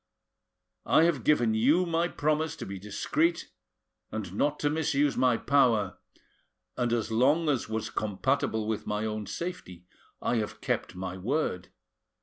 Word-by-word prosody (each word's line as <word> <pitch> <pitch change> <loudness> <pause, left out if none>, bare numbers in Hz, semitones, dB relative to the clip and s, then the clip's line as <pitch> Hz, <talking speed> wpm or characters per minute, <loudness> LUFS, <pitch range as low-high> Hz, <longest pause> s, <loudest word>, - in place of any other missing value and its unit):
I 160 - +5
have 165 -8 +2
given 120 -7 +3
you 145 +12 +3
my 170 0 +1
promise 155 0 0
to - - -7
be 95 0 -6
discreet 305 - -1 0.6
and - - -5
not 145 0 0
to 145 - +2
misuse 150 -2 +1
my 125 -3 +3
power, 115 -10 +2 0.8
and 120 -1 0
as 115 -1 -1
long 150 +8 +3
as 130 -5 0
was 110 0 -3
compatible 110 +1 -1
with 110 -1 -3
my 105 +1 -1
own 110 -2 -3
safety 95 - -6 0.3
I 120 - 0
have 105 -2 -3
kept - - -2
my 95 0 -5
word. 105 - -1
120 Hz, 145 wpm, -28 LUFS, 110-150 Hz, 0.8 s, I